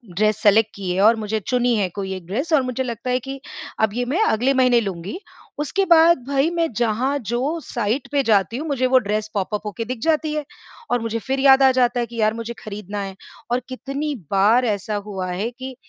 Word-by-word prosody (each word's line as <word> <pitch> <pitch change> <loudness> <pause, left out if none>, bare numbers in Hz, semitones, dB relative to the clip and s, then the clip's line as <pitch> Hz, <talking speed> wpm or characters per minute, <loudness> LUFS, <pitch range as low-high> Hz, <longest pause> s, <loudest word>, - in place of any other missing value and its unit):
Dress 215 +2 +2
select 215 +1 +5
की 190 -2 -4
है 185 +2 0
और 220 +3 +6
मुझे 220 0 -2
चुनी 245 +3 +1
है 200 -3 +1
कोई 190 +1 -5
एक 185 -2 -9
ड्रेस 270 - -2
और 300 - +5
मुझे 255 0 -2
लगता 235 0 -5
है 250 0 +2
कि 270 +2 -7 0.4
अब 220 -2 +2
ये 245 +2 -1
मैं 295 - 0
अगले 255 - +2
महीने 255 -2 +4
लूँगी। 195 - -5 0.4
उसके 385 +7 0
बाद, 340 -1 +6
भई, 280 +3 +2
मैं 335 -1 0
जहाँ 240 +5 0
जो 255 - -2
साईट 235 +2 -2
पे 285 -1 +2
जाती 215 -1 +2
हूँ, 310 +4 -4
मुझे 265 -3 +1
वो 260 +1 +5
ड्रेस 215 0 -2
पॉप 200 +1 -2
अप 210 - -3
होके 210 +2 -4
दिख 250 +1 -5
जाती 310 0 +1
है 300 -1 -2 0.5
और 245 - +2
मुझे 230 0 -2
फिर 265 +4 -2
याद 270 0 +6
आ 265 - +7
जाता 250 -1 +2
है 240 - 0
कि 235 +1 -12
यार, 215 0 +3
मुझे 230 +1 -5
खरीदना 205 -1 -6
है। 195 -1 -6 0.4
और 245 - +2
कितनी 275 +3 -4 0.2
बार 210 +6 +4
ऐसा 210 -1 -2
हुआ 190 -3 -4
है 195 +6 -2
कि 260 +1 -8
240 Hz, 225 wpm, -21 LUFS, 210-270 Hz, 0.5 s, आ